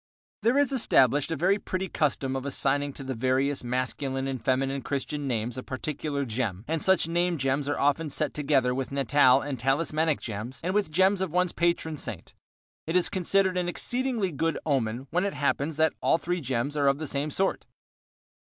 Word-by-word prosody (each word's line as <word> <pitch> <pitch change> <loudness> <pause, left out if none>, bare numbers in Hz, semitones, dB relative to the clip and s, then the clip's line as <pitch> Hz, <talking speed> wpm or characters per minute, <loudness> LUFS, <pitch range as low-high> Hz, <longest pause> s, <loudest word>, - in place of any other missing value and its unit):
There 240 +4 +3
is 285 -2 +3
established 145 - +3
a - - 0
very 190 +7 +2
pretty 190 0 -3
custom 140 -5 -1
of 135 - -3
assigning 140 +1 +1
to 135 - -9
the 130 0 -3
various 130 +3 0
masculine 130 +2 -2
and 130 -4 -4
feminine 135 +2 0
Christian 140 +1 -3
names 120 0 -2
a - - -4
particular 140 +2 -3
gem, 110 -4 -3
and 160 0 -1
such 190 -3 +3
name 175 +1 0
gems 135 +1 0
are 145 - -1
often 145 +3 +1
set - - -1
together 140 -4 +1
with 130 +1 -3
natal 135 -1 +4
and 140 -4 -4
talismanic 155 +4 +1
gems 110 +3 -6
and 185 +2 -1
with 205 -5 +1
gems 190 +4 +3
of 190 - -1
one's 180 +2 +1
patron 170 -2 0
saint. - - -5 0.5
It 165 - -2
is 180 - +3
considered 190 0 +1
an 175 -1 0
exceedingly 235 - -1
good 165 +2 -1
omen 130 -4 -1
when 180 +3 +1
it 200 - -2
happens 145 +1 0
that 160 0 +3
all - - +3
three 175 +1 -2
gems 130 +1 -2
are 145 -1 +2
of 140 0 +3
the 155 - -4
same 145 +1 -2
sort. 190 +6 -1
145 Hz, 190 wpm, -27 LUFS, 135-170 Hz, 0.5 s, natal